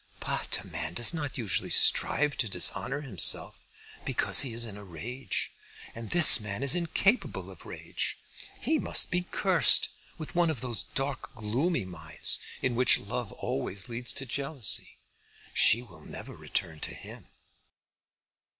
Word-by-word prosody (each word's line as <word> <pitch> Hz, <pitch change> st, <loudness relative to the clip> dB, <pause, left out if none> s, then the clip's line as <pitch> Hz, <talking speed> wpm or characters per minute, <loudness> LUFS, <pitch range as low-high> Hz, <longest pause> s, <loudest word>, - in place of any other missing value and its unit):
"But -, -, -4 dB
a -, -, -10 dB
man 80 Hz, +2 st, -6 dB
does 120 Hz, -, +1 dB
not 145 Hz, -4 st, -5 dB
usually 110 Hz, -7 st, -2 dB
strive 150 Hz, 0 st, +4 dB
to 115 Hz, -, -2 dB
dishonour 130 Hz, +9 st, -2 dB
himself 110 Hz, -, +1 dB, 0.4 s
because -, -, +3 dB
he 130 Hz, -, -1 dB
is 115 Hz, +1 st, -1 dB
in 105 Hz, -3 st, -9 dB
a 105 Hz, -, -11 dB
rage. 115 Hz, +9 st, -6 dB, 0.4 s
And 115 Hz, -1 st, -9 dB
this 170 Hz, -7 st, +10 dB
man 105 Hz, +3 st, -5 dB
is 140 Hz, -, +4 dB
incapable 185 Hz, +6 st, -1 dB
of -, -, -15 dB
rage. -, -, -5 dB, 0.4 s
He 315 Hz, -1 st, -1 dB
must -, -, 0 dB
be 180 Hz, 0 st, -2 dB
cursed 190 Hz, -4 st, +4 dB, 0.3 s
with 155 Hz, +2 st, -7 dB
one 175 Hz, -2 st, +1 dB
of 145 Hz, -7 st, -4 dB
those 120 Hz, -4 st, -1 dB
dark 135 Hz, 0 st, -4 dB
gloomy 120 Hz, -, -2 dB
minds 80 Hz, -4 st, -2 dB, 0.2 s
in 130 Hz, -, 0 dB
which 125 Hz, +1 st, +4 dB
love -, -, -6 dB
always 95 Hz, -, -5 dB
leads 120 Hz, +1 st, -3 dB
to 135 Hz, -1 st, -2 dB
jealousy. 140 Hz, -3 st, -2 dB, 0.6 s
She 115 Hz, +3 st, +4 dB
will 85 Hz, -10 st, -17 dB
never -, -, -10 dB
return 80 Hz, -2 st, -4 dB
to -, -, -5 dB
him." -, -, -12 dB
125 Hz, 150 wpm, -27 LUFS, 105-145 Hz, 0.6 s, this